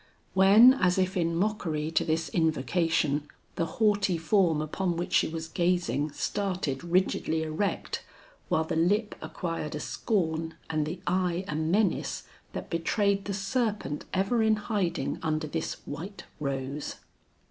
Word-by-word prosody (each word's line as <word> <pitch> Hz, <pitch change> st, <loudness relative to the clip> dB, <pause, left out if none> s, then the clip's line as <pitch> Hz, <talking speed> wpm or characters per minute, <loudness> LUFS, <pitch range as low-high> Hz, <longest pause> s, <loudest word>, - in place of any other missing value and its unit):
When 205 Hz, +7 st, +8 dB
as 180 Hz, -8 st, +2 dB
if 185 Hz, +1 st, +1 dB
in 170 Hz, -2 st, +1 dB
mockery 165 Hz, -6 st, -1 dB
to -, -, +2 dB
this 160 Hz, 0 st, 0 dB
invocation, 160 Hz, -2 st, +1 dB, 0.3 s
the 165 Hz, -, 0 dB
haughty 205 Hz, -5 st, +3 dB
form 165 Hz, -1 st, +2 dB
upon 170 Hz, +3 st, -1 dB
which 175 Hz, -, -3 dB
she -, -, +4 dB
was 160 Hz, 0 st, -5 dB
gazing 170 Hz, -5 st, 0 dB
started 185 Hz, -10 st, -2 dB
rigidly 170 Hz, -2 st, +1 dB
erect, 160 Hz, +5 st, -2 dB, 0.5 s
while 160 Hz, -, +2 dB
the 160 Hz, -, -3 dB
lip 205 Hz, +7 st, +2 dB
acquired 165 Hz, -4 st, -4 dB
a -, -, -3 dB
scorn 160 Hz, -5 st, -1 dB, 0.2 s
and 155 Hz, -1 st, 0 dB
the 175 Hz, +3 st, -5 dB
eye 180 Hz, 0 st, 0 dB
a -, -, -3 dB
menace 170 Hz, +6 st, 0 dB, 0.3 s
that -, -, -6 dB
betrayed 200 Hz, +4 st, +1 dB
the 200 Hz, -, -2 dB
serpent 205 Hz, -, -1 dB
ever 195 Hz, +5 st, +1 dB
in 220 Hz, 0 st, +4 dB
hiding 205 Hz, -5 st, -1 dB
under 155 Hz, -1 st, -1 dB
this 160 Hz, +1 st, -3 dB
white 175 Hz, +8 st, -7 dB, 0.2 s
rose. 140 Hz, 0 st, -3 dB
170 Hz, 140 wpm, -28 LUFS, 160-195 Hz, 0.5 s, When